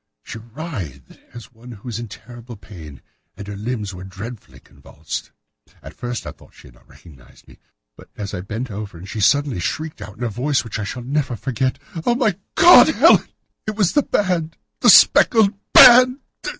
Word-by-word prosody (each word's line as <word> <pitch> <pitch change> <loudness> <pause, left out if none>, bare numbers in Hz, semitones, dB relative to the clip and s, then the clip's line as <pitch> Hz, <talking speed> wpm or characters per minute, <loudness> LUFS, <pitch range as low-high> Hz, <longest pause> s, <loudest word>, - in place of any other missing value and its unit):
She 115 - -9
writhed 110 - -9
as 120 -1 -12
one 120 +2 -14
who 105 +3 -14
is 115 -1 -5
in 120 - -7
terrible 120 +3 -12
pain, 80 - -13 0.3
and 100 - -9
her 100 - -7
limbs 105 -1 -5
were 90 0 -10
dreadfully 100 +5 -10
convulsed. 75 +1 -9 0.5
At - - -11
first 120 -1 -6
I - - -6
thought - - -21
that - - -26
she - - -17
had - - -20
not - - -26
recognised 65 -8 -19
me, - - -19 0.4
but - - -17
as 100 -1 -6
I 90 - -5
bent 110 +6 -6
over 100 -4 -8
her 90 - -11
she 105 +3 -7
suddenly 135 +2 +1
shrieked 155 - -5
out 100 +1 -10
in 125 - -7
a - - -1
voice 135 +6 -1
which 115 -2 -7
I 105 - -4
shall 125 +4 -7
never 135 -1 -2
forget, 130 +2 -3 0.3
'Oh, 240 - +1
my 225 -7 0 0.2
God! 350 +1 +8
Helen! - - +4 0.4
It 215 - -3
was 200 -5 +1
the 290 - +3
band! 180 - -2 0.2
The - - +4
speckled 220 -4 +5 0.2
band! 250 +1 +8
120 Hz, 195 wpm, -19 LUFS, 100-150 Hz, 0.5 s, God